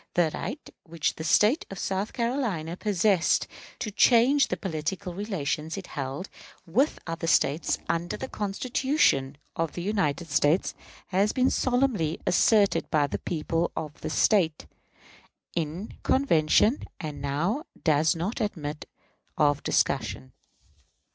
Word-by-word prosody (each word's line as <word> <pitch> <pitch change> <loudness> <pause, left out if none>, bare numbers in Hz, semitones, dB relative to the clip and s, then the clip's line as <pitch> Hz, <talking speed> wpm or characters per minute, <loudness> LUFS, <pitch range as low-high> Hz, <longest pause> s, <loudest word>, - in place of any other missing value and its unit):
The 170 -3 +3
right 285 - -5 0.2
which 165 -2 -2
the 160 - -7
State 210 - +3
of 195 - -7
South 195 +3 -2
Carolina 230 - -2
possessed 195 -2 +2 0.3
to 215 - -4
change 250 +6 +5
the 180 - -2
political 175 +1 -4
relations 170 -5 -3
it 195 - -6
held 140 +6 -5 0.4
with 245 - +1
other 165 0 -4
States, 150 -1 +2
under 170 +1 -1
the - - -5
Constitution 205 - 0 0.2
of 165 -2 -2
the 175 - -5
United 180 -6 0
States, 145 +5 +2 0.4
has 195 +3 +2
been 255 0 +2
solemnly 245 - +1
asserted 205 +2 +3
by 150 -4 +3
the 140 - -4
people 165 0 -1
of 150 -1 -6
this 155 - -3
State, 165 -7 +2 0.9
in 170 +5 -3
convention, 220 - +3 0.2
and 150 -4 -6
now 170 - -1 0.2
does 155 0 +3
not 190 +9 -3
admit 155 -8 -4 0.5
of 145 -2 +3
discussion. 65 0 -1
175 Hz, 130 wpm, -27 LUFS, 155-210 Hz, 0.9 s, change